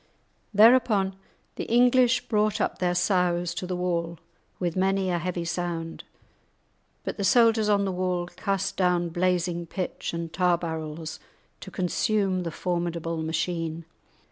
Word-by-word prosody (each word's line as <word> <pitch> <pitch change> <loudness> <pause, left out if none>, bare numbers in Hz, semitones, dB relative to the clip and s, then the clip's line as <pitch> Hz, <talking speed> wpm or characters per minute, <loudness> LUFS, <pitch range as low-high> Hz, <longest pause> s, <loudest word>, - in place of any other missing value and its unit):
Thereupon 215 -3 +5 0.4
the - - -3
English 245 +1 +4
brought 215 -1 +1
up - - -1
their 180 -1 +1
sows[#] 175 -2 +1
to 180 +1 -5
the 180 - -2
wall 170 -2 -2 0.4
with 175 -3 -2
many 190 0 +1
a 175 - 0
heavy 175 0 -3
sound, 165 -1 -4 1.0
but - - -4
the 200 - -2
soldiers 225 0 +4
on 200 -1 +3
the 195 - -1
wall 180 -1 -1
cast 195 +2 -2
down 180 -2 +2
blazing 175 0 0
pitch 185 +2 -4
and 170 -1 -5
tar 180 -2 +3
barrels, 160 -1 -5 0.4
to - - -9
consume 190 0 0
the 170 - -3
formidable 170 -1 -2
machine. 165 0 -2
180 Hz, 140 wpm, -26 LUFS, 170-195 Hz, 1.0 s, Thereupon